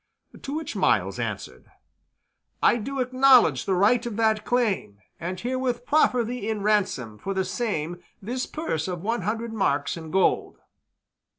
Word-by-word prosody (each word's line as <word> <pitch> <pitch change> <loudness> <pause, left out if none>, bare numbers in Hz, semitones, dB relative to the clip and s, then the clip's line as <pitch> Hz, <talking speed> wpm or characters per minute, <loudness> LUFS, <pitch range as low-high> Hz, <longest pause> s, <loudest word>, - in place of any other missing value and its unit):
To 280 - -5
which 320 0 -4
Myles - - +1
answered, - - -5 0.9
"I - - +5
do 270 +5 -4
acknowledge 255 - +5
the 190 - +2
right 215 +6 +3
of 235 -4 -4
that 220 -2 +2
claim, 215 - 0 0.2
and 180 +2 -4
herewith 250 +1 -2
proffer 250 -5 +3
thee 230 -2 -4
in 215 -2 -2
ransom 185 - 0
for 195 0 -4
the 190 0 0
same 175 -8 -3 0.2
this 250 +6 -3
purse 160 - -3
of 180 -2 -4
one 225 +1 -1
hundred 225 +4 -3
marks 145 -10 0
in 160 -2 -8
gold." 190 +3 +1
220 Hz, 155 wpm, -25 LUFS, 185-245 Hz, 0.9 s, I